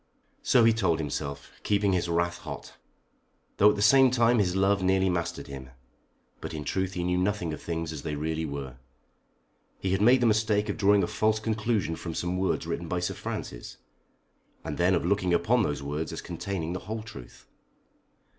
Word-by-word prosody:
So 120 - +4
he 115 0 +5
told 95 -7 +1
himself, 70 -2 -4
keeping 100 -1 +1
his 85 -1 0
wrath 85 +1 0
hot, - - -8 0.8
though 105 - +7
at 105 - +1
the 100 - -1
same 130 +4 +6
time 120 -1 +3
his 90 -3 +1
love 95 +1 +2
nearly 95 0 +2
mastered 85 -1 -3
him. 65 -2 -9 0.7
But - - -6
in 75 - -4
truth 95 +4 -2
he 90 - -3
knew 90 0 +1
nothing 90 -4 -1
of 75 - -7
things 80 -1 -4
as 75 - -6
they 75 0 -4
really 80 +2 -2
were. 70 -4 -6 1.0
He 95 - -2
had 95 +1 +1
made 125 +4 +6
the - - +3
mistake 110 -1 +2
of 100 - -2
drawing 100 -2 +4
a - - 0
false 110 0 +1
conclusion 110 -5 -1
from 80 -1 -6
some 90 +1 -2
words 95 -3 0
written 85 0 -4
by 90 +2 -1
Sir 90 - -2
Francis, - - -6 0.9
and 75 - -5
then 90 +2 +4
of 85 - -1
looking 95 -2 +2
upon 115 +9 +2
those 75 -8 -2
words 75 +3 -3
as - - -5
containing 90 -4 -4
the 90 - -3
whole 110 0 -3
truth. 65 - -12
90 Hz, 195 wpm, -27 LUFS, 80-105 Hz, 1.0 s, though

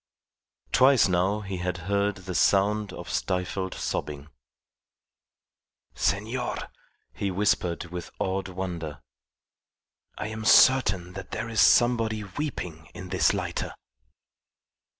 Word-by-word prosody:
Twice 130 -3 +5
now 95 +3 +1
he 95 -2 -5
had 90 0 -2
heard 100 +1 +1
the 90 -1 -7
sound 100 +3 +2
of - - -8
stifled 95 0 -2
sobbing. 75 0 -4 1.6
"Senor," 115 +5 -1 0.6
he 100 - -2
whispered 90 -3 0
with 90 -1 -6
awed 95 0 -2
wonder, 85 -6 -5 1.1
"I 105 - -4
am 110 0 -6
certain 100 -8 +5
that 95 0 -8
there 115 - -4
is 110 -3 +2
somebody 115 -1 +4
weeping 90 - -5
in 95 - -8
this - - +3
lighter." - - -3
95 Hz, 110 wpm, -26 LUFS, 90-105 Hz, 1.6 s, Twice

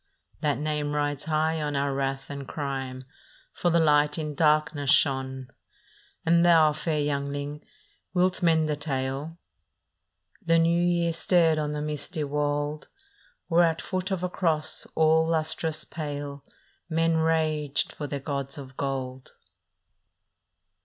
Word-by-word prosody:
" - - -37
That 150 -1 +1
name 150 0 -2
rides 145 -1 -1
high 160 0 0
on 145 -1 -2
our 140 0 0
wrath 135 0 -2
and 140 -1 -6
crime, 135 -3 -4 0.5
For 175 - 0
the 170 - +3
Light 150 -2 +3
in 150 -2 -3
darkness 155 -1 +2
shone. 130 -2 +2 0.4
" - - -32
And 170 +1 +4
thou, 165 -3 +6
fair 155 0 -1
youngling, 145 0 -3 0.5
wilt 180 0 +1
mend 160 -2 +3
the 150 - 0
tale? 140 +2 -3 0.5
" 90 0 -40
The 165 0 +5
New 170 +1 +3
Year 170 -1 +1
stared 165 -2 +3
on 150 -1 -1
the 150 0 -3
misty 150 +2 -3
wold, 145 +1 -2 0.6
Where 170 0 +4
at 165 -1 +1
foot 185 0 -3
of 190 -2 -2
a 180 - 0
cross 155 -4 0
all 160 0 +4
lustrous 160 -1 -1
pale 145 -2 -6 0.5
Men 165 0 +2
raged 155 -3 0
for 145 - -5
their 140 0 -4
gods 140 0 -4
of 130 -2 -9
gold. 130 -2 -4
150 Hz, 145 wpm, -27 LUFS, 140-160 Hz, 0.6 s, thou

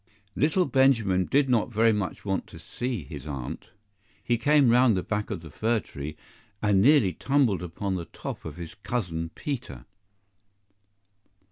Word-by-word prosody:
LITTLE 160 +6 +2
Benjamin 115 -9 +3
did 140 0 +2
not 120 -2 +1
very 115 0 +4
much 105 -2 -3
want 95 -1 -1
to 85 - -12
see 115 - -4
his 70 - -9
Aunt. 70 -4 -6 0.5
He 120 - +1
came 140 +1 +4
round 120 -3 +5
the 90 - -1
back 105 +1 -2
of 100 -7 -4
the 80 - -10
fir 110 +7 +1
tree, 75 -4 -8 0.4
and 100 -2 +3
nearly 125 -6 +5
tumbled 135 -9 +1
upon 95 +3 -3
the 90 -2 -3
top - - -7
of 80 0 -8
his 85 -2 -7
Cousin 90 -8 -3
Peter. 135 -4 -5
105 Hz, 155 wpm, -27 LUFS, 90-125 Hz, 0.5 s, round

